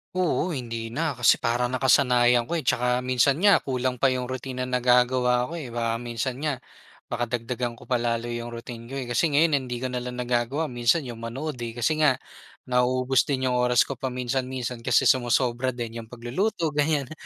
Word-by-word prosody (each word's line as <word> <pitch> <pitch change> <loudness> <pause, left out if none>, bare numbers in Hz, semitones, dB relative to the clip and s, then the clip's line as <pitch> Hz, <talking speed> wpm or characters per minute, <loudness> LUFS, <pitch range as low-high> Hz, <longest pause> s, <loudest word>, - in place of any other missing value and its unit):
Oo, 180 -1 0
hindi 115 -3 -4
na, 150 +8 -1
kasi 120 - +6
parang 120 +1 0
nakasanayan 125 -2 +3
ko 170 - -2
eh, 160 - -2
tsaka 125 0 +1
minsan 130 +2 +3
nga, 200 -2 +6
kulang 130 -1 -2
pa 135 - +4
yung 130 -1 0
routine 130 0 -4
na 125 0 -1
nagagawa 125 +1 +3
ko 170 - -4
eh. 145 - -6
Baka 115 -1 -2
minsan 120 +2 -4
nga, 145 -4 -2 0.5
baka 120 0 -1
dagdagan 120 +1 -3
ko - - -15
pa 125 -2 0
lalo 120 0 -1
yung 120 0 -4
routine 115 0 -8
ko 135 - -7
eh. 135 - -3
Kasi 145 +7 +2
ngayon 145 -4 +3
hindi 125 0 -5
ko 130 - -2
na 125 - -2
lang 125 0 -6
nagagawa, 125 +5 -1
minsan 120 +6 +2
yung 120 -3 -8
manood 130 +5 -5
eh, 115 -1 -5
kasi 125 +6 0
nga, 150 -4 +4 0.5
nauubos 125 +1 +2
din 130 -2 0
yung - - 0
oras 125 -1 +4
ko 135 -3 -7
paminsan-minsan, 125 -1 -3
kasi 115 - +2
sumosobra 125 0 +2
din 115 -1 -5
yung 115 - -9
pagluluto, 150 - -2
ganyan. 145 -2 0
125 Hz, 195 wpm, -25 LUFS, 120-130 Hz, 0.5 s, kasi